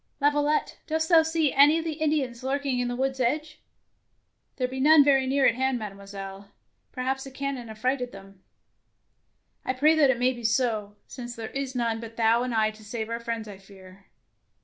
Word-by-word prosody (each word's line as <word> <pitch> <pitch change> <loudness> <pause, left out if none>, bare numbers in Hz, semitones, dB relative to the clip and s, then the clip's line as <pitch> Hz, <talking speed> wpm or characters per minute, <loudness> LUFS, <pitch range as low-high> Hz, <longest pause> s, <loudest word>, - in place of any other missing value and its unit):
Laviolette, 295 +1 +1
dost 320 0 -1
thou 330 -2 +7
see 320 -2 0
any 290 +3 +6
of 325 - -3
the 315 -1 -4
Indians 275 -6 -1
lurking 270 -1 -1
at 245 - -1
the 245 - -3
woods' 265 +1 -1
edge!" 300 +5 -1 0.5
" - - -48
There 255 -2 -1
be 260 +1 -6
none 300 +2 +7
very 270 -2 +3
near 270 +1 +2
at - - +5
hand, 260 +1 0
Mademoiselle. 200 -2 -8 0.4
Perhaps 265 +1 -2
the 270 - -8
cannon 270 -3 -5
affrighted 250 +3 -2
them. 195 -1 -14 0.4
' - - -48
' - - -47
" - - -47
I 255 - -1
pray 295 +5 +4
that 305 -4 +4
it 260 - +2
may 250 +2 +2
be 240 -1 -10
so, 220 -3 0
since 240 -2 -8
there 225 -1 -7
is 270 -1 -4
none 230 -2 -1
but 230 0 -10
thou 230 +1 +3
and 250 0 -2
I 215 -1 +2
to 215 0 -16
save 220 +1 -5
our 230 - -2
friends, 230 -1 -4
I 200 -2 -10
fear." 195 -1 -16
255 Hz, 210 wpm, -26 LUFS, 225-280 Hz, 0.5 s, thou